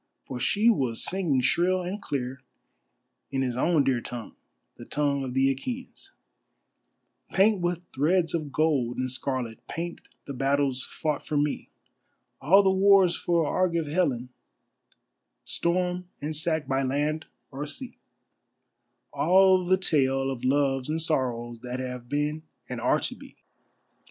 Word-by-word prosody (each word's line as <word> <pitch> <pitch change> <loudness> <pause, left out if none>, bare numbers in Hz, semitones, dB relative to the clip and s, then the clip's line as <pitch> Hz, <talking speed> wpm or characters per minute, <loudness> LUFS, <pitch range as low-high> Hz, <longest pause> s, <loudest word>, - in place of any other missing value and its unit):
For 130 - -6
she 205 - +2
was 130 - +3
singing 170 -9 +1
shrill 180 +7 +2
and 190 +4 -5
clear 130 -1 -4 0.9
in 135 -1 -1
his 125 -2 -2
own 155 +3 +3
dear 130 -3 +1
tongue, 120 -2 -7 0.4
the - - -11
tongue 140 -2 0
of 130 -1 -5
the 135 +1 +3
Achæans: 250 - -7 1.2
Paint 200 0 +4
with 175 0 -1
threads 165 +4 +2
of 155 -4 -2
gold 140 -6 +1
and 130 0 -2
scarlet, 130 -3 -3
paint 170 +1 -5 0.2
the 140 - -6
battles 135 0 +1
fought 150 -2 -2
for 150 - -2
me, 145 0 -1 0.7
All 190 +9 +6
the 190 - +4
wars 190 -2 +5
for 170 -2 +1
Argive 170 +1 +1
Helen; 145 -6 0 1.2
storm 180 +1 0
and 155 +2 -4
sack 160 0 0
by 135 0 +1
land 145 +4 -1 0.2
or 145 +2 -5
sea; 250 - -5 1.1
All 190 0 +5
the 185 +1 +4
tale 135 -7 +1
of 125 -3 -6
loves 135 0 +1
and 160 +1 0
sorrows 120 -7 -1
that 125 0 -5
have 125 -2 -6
been 150 +2 -1 0.3
and - - -5
are - - +3
to - - -1
be. - - -15
145 Hz, 140 wpm, -27 LUFS, 130-175 Hz, 1.2 s, All